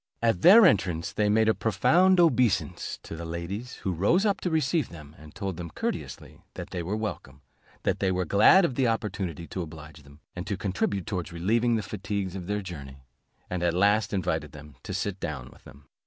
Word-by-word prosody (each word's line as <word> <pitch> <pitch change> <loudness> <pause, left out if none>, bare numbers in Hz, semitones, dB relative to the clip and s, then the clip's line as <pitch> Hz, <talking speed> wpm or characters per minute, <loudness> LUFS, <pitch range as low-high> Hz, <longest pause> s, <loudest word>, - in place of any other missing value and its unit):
At 115 -6 +1
their 210 - +9
entrance 95 - +1
they 105 0 +1
made 110 +1 +3
a 110 - +4
profound 165 - +3
obeisance 130 - +2
to - - -8
the 85 - -7
ladies, 85 +9 -5
who 95 - -1
rose 130 - +2
up 200 -2 +1
to 180 - -1
receive 160 -1 0
them, 75 -2 -12
and 75 -1 -14
told 95 -4 -4
them 85 -1 -6
courteously - - -5
that - - -7
they 90 - -3
were 90 +5 -3
welcome, 80 -10 -6 0.4
that - - 0
they 95 -1 +1
were 90 0 -1
glad 110 - +6
of 140 - -1
the 130 0 +1
opportunity 100 -7 -3
to 95 - -4
oblige 75 -2 -10
them, 70 +1 -18 0.2
and 90 +3 -6
to 100 - -2
contribute 95 -1 -2
towards 90 -5 -4
relieving 115 +8 +1
the 110 - -1
fatigues 100 -2 -4
of 90 -2 -6
their 105 0 -2
journey, 70 -7 -9 0.4
and 90 -1 -3
at 85 -1 +1
last 100 +3 +3
invited 90 -6 -2
them 75 -1 -12
to - - -6
sit 100 -2 -3
down 65 -7 -5
with - - -22
them. 70 +1 -16
95 Hz, 205 wpm, -27 LUFS, 85-110 Hz, 0.4 s, their